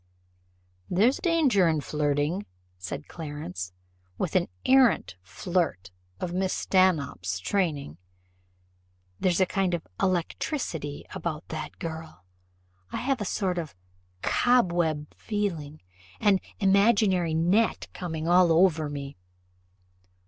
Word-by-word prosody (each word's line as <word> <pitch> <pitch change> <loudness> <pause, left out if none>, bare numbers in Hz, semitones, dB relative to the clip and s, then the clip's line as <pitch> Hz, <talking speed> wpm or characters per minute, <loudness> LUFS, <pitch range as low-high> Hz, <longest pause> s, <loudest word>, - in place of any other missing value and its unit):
"There's 220 +9 +3
danger 285 - +3
in 160 -2 +2
flirting," 150 +5 -1 0.3
said 140 +11 -6
Clarence, 145 - -6 0.5
"with - - -2
an - - +3 0.2
arrant 260 - +4
flirt 105 - -2 0.3
of 180 - -3
Mrs. 185 +1 0
Stanhope's 150 - +1
training. 145 - -1 1.2
There's 180 -1 +2
a 190 - +5
kind 185 -1 0
of 170 - -6 0.2
electricity 170 - -2
about 160 -2 -4
that 155 - -6
girl. 160 - -7 0.7
I - - -3
have 265 -2 -1
a - - -1
sort 185 -2 -1
of 155 - -6 0.5
cobweb 175 -11 +2
feeling, 170 - -3 0.4
an 200 -2 +4 0.2
imaginary 195 -4 +3
net 185 +8 +2
coming 160 -3 -4
all 175 0 +5
over 160 -3 +4
me." 140 -3 -6
170 Hz, 105 wpm, -27 LUFS, 150-195 Hz, 1.2 s, a